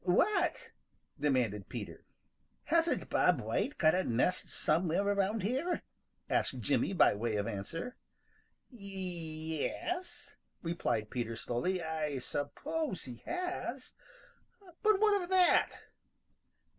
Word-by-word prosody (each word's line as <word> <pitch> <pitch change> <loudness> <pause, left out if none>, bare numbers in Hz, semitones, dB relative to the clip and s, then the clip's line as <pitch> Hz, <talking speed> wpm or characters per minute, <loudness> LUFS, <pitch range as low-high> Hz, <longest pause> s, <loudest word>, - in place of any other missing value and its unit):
"What?" 335 - +2 0.5
demanded 120 - +1
Peter. - - -7 0.6
"Hasn't 335 0 +1
Bob - - +4
White 290 - -1
got 155 0 +5
a 185 - +2
nest 130 +9 +1
somewhere 170 +5 +2
around 200 +1 +1
here?" 270 - 0 0.4
asked - - 0
Jimmy - - +1
by 190 - +5
way 110 +2 -1
of 105 -1 0
answer. 165 - -5 0.7
"Y 245 - -14
e 165 -5 -3
s," 360 +2 -3 0.3
replied 165 -10 -1
Peter 120 -2 -2
slowly, 175 +12 -1
"I 155 -3 -2
suppose 285 - -3
he 125 -3 -8
has. 360 +1 -3 0.9
But 430 -2 +4
what 420 -2 +4
of 350 - -6
that?" 370 -2 +5
180 Hz, 115 wpm, -33 LUFS, -, 0.9 s, got